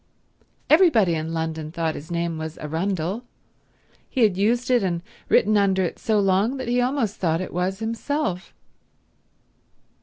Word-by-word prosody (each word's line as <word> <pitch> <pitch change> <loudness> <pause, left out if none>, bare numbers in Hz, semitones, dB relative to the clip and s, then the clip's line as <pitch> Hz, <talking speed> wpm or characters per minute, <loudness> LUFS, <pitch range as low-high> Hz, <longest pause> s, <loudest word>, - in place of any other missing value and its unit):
Everybody 300 - +5
in 160 0 -3
London 160 -1 -3
thought 165 -2 -1
his 155 +1 -9
name 170 -1 -2
was 160 0 -6
Arundel. 180 +6 -2 0.9
He 260 - -1
had 205 -4 +4
used 235 +6 +1
it 245 -2 +4
and 175 -3 -1 0.3
written 215 +2 +4
under 190 -2 +2
it 175 - -3
so 215 -2 +1
long 200 +6 +2
that 260 - -5
he 245 +1 +2
almost 245 -5 0
thought 165 -3 0
it 185 - -5
was 185 +2 -1
himself. 225 -3 -3
190 Hz, 150 wpm, -23 LUFS, 165-230 Hz, 0.9 s, Everybody